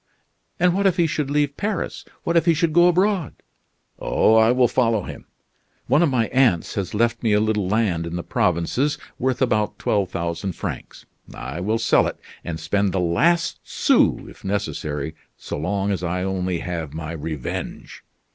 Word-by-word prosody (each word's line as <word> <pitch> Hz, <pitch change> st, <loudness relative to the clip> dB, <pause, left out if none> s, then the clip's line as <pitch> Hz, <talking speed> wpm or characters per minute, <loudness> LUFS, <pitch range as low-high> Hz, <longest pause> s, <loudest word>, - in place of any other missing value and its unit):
"And 180 Hz, 0 st, +4 dB
what 200 Hz, +1 st, +2 dB
if 185 Hz, -1 st, +1 dB
he 170 Hz, -, +4 dB
should 155 Hz, -3 st, -2 dB
leave 145 Hz, -1 st, +1 dB
Paris? 210 Hz, 0 st, -3 dB, 0.2 s
What 170 Hz, -, -1 dB
if 170 Hz, +1 st, +3 dB
he 165 Hz, -, +5 dB
should 165 Hz, 0 st, +1 dB
go 175 Hz, +1 st, +6 dB
abroad?" 185 Hz, -, +1 dB, 0.6 s
"Oh, -, -, +2 dB
I 110 Hz, +1 st, +5 dB
will 125 Hz, 0 st, +4 dB
follow 115 Hz, -4 st, +1 dB
him. -, -, -9 dB, 0.6 s
One 135 Hz, +6 st, +3 dB
of 170 Hz, -, +4 dB
my 125 Hz, -4 st, +1 dB
aunts 125 Hz, -10 st, +2 dB
has 100 Hz, -1 st, -3 dB
left 115 Hz, +1 st, +1 dB
me 110 Hz, -3 st, +2 dB
a 105 Hz, -, +4 dB
little 105 Hz, -3 st, 0 dB
land 95 Hz, -5 st, 0 dB
in 85 Hz, -, -5 dB
the 85 Hz, -, -3 dB
provinces 90 Hz, -, 0 dB, 0.2 s
worth 130 Hz, +1 st, +1 dB
about 110 Hz, -4 st, 0 dB
twelve 100 Hz, -4 st, 0 dB
thousand 85 Hz, +3 st, -3 dB
francs. -, -, -7 dB, 0.3 s
I 65 Hz, +6 st, -6 dB
will 105 Hz, +5 st, 0 dB
sell 115 Hz, -, +3 dB
it, -, -, -5 dB, 0.3 s
and 80 Hz, -2 st, -5 dB
spend 100 Hz, -2 st, 0 dB
the 95 Hz, -, 0 dB
last 165 Hz, -, +2 dB
sou, -, -, +2 dB
if -, -, -14 dB
necessary, 80 Hz, -7 st, -3 dB, 0.2 s
so -, -, -6 dB
long 100 Hz, +5 st, -1 dB
as 95 Hz, -, -2 dB
I 90 Hz, +1 st, -1 dB
only 95 Hz, -2 st, -2 dB
have 80 Hz, -4 st, -5 dB
my 80 Hz, 0 st, -5 dB
revenge. 80 Hz, -4 st, -6 dB
105 Hz, 180 wpm, -22 LUFS, 90-145 Hz, 0.6 s, go